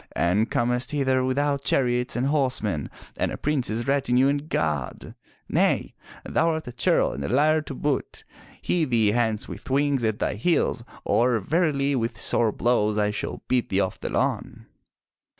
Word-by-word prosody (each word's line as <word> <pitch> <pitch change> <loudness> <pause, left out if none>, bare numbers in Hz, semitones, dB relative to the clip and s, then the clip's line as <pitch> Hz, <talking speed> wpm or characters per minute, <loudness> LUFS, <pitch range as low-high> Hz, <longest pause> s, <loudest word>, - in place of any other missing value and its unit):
And 100 +6 +1
comest 125 +1 0
hither 130 -3 +1
without 140 +2 0
chariots 125 -2 +1
and 125 +2 0
horsemen, 125 - 0 0.3
and - - -1
a - - -5
prince's 120 -6 -1
retinue 135 -1 +2
and 145 +2 -2
guard! 75 -6 -2 0.3
Nay, - - +1 0.3
thou 165 +2 +1
art 160 -3 -3
a 125 - -6
churl - - +2
and 70 +3 -5
a - - -3
liar 155 +6 +3
to 145 -2 -8
boot. 145 0 -2 0.4
Hie 170 -3 +2
thee 115 -6 +2
hence 110 -1 0
with - - -9
wings 140 -1 +1
at 110 -2 0
thy - - -1
heels, 120 - 0 0.2
or 120 0 +2
verily 145 - +1
with 115 -2 -2
sore 115 -2 +3
blows 110 -2 +1
I 105 0 +1
shall 105 - -5
beat 125 -2 0
thee 95 - +1
off 95 -2 -1
the - - -4
lawn." - - -2
125 Hz, 170 wpm, -25 LUFS, 110-140 Hz, 0.4 s, liar